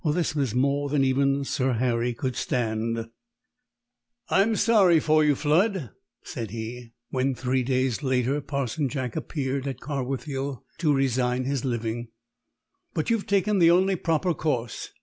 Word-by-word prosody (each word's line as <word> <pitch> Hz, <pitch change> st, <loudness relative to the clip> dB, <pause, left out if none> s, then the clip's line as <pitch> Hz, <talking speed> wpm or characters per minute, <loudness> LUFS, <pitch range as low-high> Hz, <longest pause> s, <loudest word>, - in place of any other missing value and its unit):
This 160 Hz, +1 st, 0 dB
was 135 Hz, -6 st, -1 dB
more 140 Hz, +2 st, +1 dB
than 140 Hz, -1 st, +2 dB
even 135 Hz, +1 st, +2 dB
Sir 130 Hz, -1 st, 0 dB
Harry 120 Hz, 0 st, 0 dB
could 130 Hz, 0 st, -3 dB
stand. 115 Hz, -1 st, -1 dB, 1.2 s
"I'm 215 Hz, +4 st, +3 dB
sorry 205 Hz, -7 st, +5 dB
for 155 Hz, 0 st, +3 dB
you, 150 Hz, -1 st, +3 dB
Flood," 160 Hz, -, +1 dB, 0.3 s
said 115 Hz, -3 st, -5 dB
he, 115 Hz, +2 st, -7 dB, 0.2 s
when, 130 Hz, 0 st, 0 dB
three 130 Hz, +1 st, 0 dB
days 130 Hz, 0 st, 0 dB
later, 130 Hz, +1 st, +1 dB
Parson 140 Hz, 0 st, -2 dB
Jack 130 Hz, -4 st, -4 dB
appeared 135 Hz, -2 st, -3 dB
at 135 Hz, -3 st, -4 dB
Carwithiel 135 Hz, -1 st, -4 dB, 0.2 s
to 160 Hz, -3 st, +2 dB
resign 130 Hz, -1 st, +1 dB
his 135 Hz, -1 st, -2 dB
living. 120 Hz, -2 st, -2 dB, 0.9 s
"But 155 Hz, -, 0 dB
you've 225 Hz, -3 st, 0 dB
taken 200 Hz, 0 st, +2 dB
the 170 Hz, -1 st, +6 dB
only 185 Hz, +3 st, +4 dB
proper 170 Hz, +1 st, 0 dB
course. 130 Hz, -7 st, -2 dB
135 Hz, 145 wpm, -26 LUFS, 125-155 Hz, 1.2 s, the